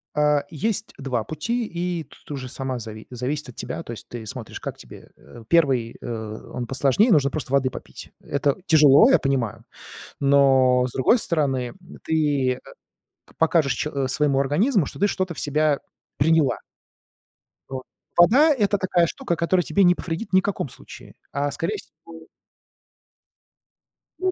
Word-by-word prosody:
А, 150 -1 +3
есть 220 +8 -2
2 130 -5 -2
пути, 230 +10 -2
и 175 -1 -3
тут - - -16
уже 130 -3 -5
сама 130 -1 -4
зави 110 -1 -9
зависит 130 +3 -3
от 120 - -12
тебя. - - -5
То - - -8
есть 115 - -9
ты 120 -2 -7
смотришь, 105 - -7
как - - -6
тебе. - - -13
Э, 110 +11 -14
1, 135 -9 +2
э, - - -9 0.5
он 125 - -3
посложнее: 140 - +2
нужно 140 -5 +4
просто 140 -3 -5
воды 135 -2 +3
попить. - - -10
Это 140 0 0
тяжело, 150 - +7
я - - +5
понимаю. 130 -6 -2 0.6
Но 135 -2 +4
с 125 - -7
другой 180 - +3
стороны, 135 - 0
м, - - -11 0.3
ты, 145 -5 +1
э, - - -11 0.7
к - - -23
покажешь 160 -4 +3
че 150 - -3
э, 135 -2 -1
своему 140 0 +1
организму, 165 - +2
что - - -9
ты 205 - +3
что-то 185 -3 -2
в - - -7
себя 150 0 +1 0.4
приняла. 160 -1 +3 1.1
Вот. 130 -1 -5 0.3
Вода- 270 - +6
это 205 -1 +2
такая 180 -3 +2
штука, 170 - -3
которая 175 +2 +1
тебе 200 +4 +2
не 180 0 +5
повредит 175 +5 -5
ни 190 - +6
каком 195 -9 -3
случае, - - -13 0.2
а 140 0 -1
скорее 165 +9 -2
всего 165 -2 -14 1.9
Ну 370 0 +1
150 Hz, 165 wpm, -23 LUFS, 130-175 Hz, 1.9 s, тяжело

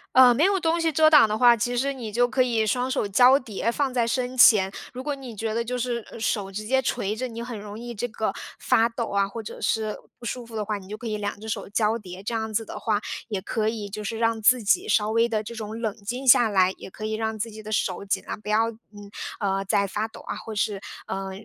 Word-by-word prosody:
呃 255 -1 +8
没 290 +8 +3
有 395 0 +3
东 330 +1 +1
西 330 -1 +1
遮 310 +2 +6
挡 300 -7 +7
的 215 0 -1
话， 240 0 +6
其 245 +3 -1
实 275 +3 +1
你 250 -5 -6
就 240 +3 +3
可 255 +2 +1
以 235 -3 +2
双 250 +4 0
手 260 -4 0
交 245 +7 +6
叠 230 -4 -3
放 265 +2 0
在 240 -2 +1
身 255 +1 -2
前。 205 -6 +7 0.2
如 255 +1 -6
果 295 +1 -1
你 265 -5 -8
觉 220 +1 -3
得 230 - 0
就 250 +2 -3
是 240 -2 -2
呃 - - -10
手 210 -3 -1
直 210 +2 -6
接 265 +4 +2
垂 235 -5 -1
着， 250 +4 -3
你 230 -1 -6
很 235 -3 -6
容 205 0 -8
易 240 +1 -7
这 235 +2 -3
个 220 -1 -2 0.3
发 225 - +3
抖 235 0 -4
啊， 200 0 +1
或 225 +3 -7
者 - - -8
是 215 -1 -1 0.2
不 240 - -12
舒 245 0 -4
服 230 -1 -11
的 215 - -1
话， 210 0 -2
你 190 -2 -12
就 210 - -6
可 240 - -10
以 215 -2 -2
2 205 -1 -3
只 220 - -7
手 - - -3
交 215 +2 +1
叠， 185 -2 -10
这 220 - -3
样 220 -1 -2
子 225 - 0
的 - - -7
话， 215 -2 0 0.3
也 205 -4 -3
可 215 +3 -1
以 220 -2 -3
就 210 +1 -6
是 225 - -3
让 230 -1 +1
自 245 +2 +4
己 355 - +2
稍 210 - +2
微 230 +1 +3
地 220 -2 -1
这 225 - -8
种 220 -1 -6
冷 220 -3 -1
静 240 +6 -5
下 240 -2 +7
来， 190 -3 +3
也 - - -10
可 215 - -10
以 215 0 -2
让 220 0 -2
自 225 +2 -4
己 215 0 -9
的 215 - -9
手 195 -1 -1
尽 195 - -1
量 - - -6
不 210 - -14
要 220 +2 +2
嗯 205 -2 -14 0.3
啊 195 -2 -1
在 200 0 +2
发 210 +3 -2
抖 225 - -13
啊， - - -5
或 220 - -7
是 205 -1 0 0.3
呃 195 0 -4
225 Hz, 290 characters per minute, -25 LUFS, 210-245 Hz, 0.3 s, 呃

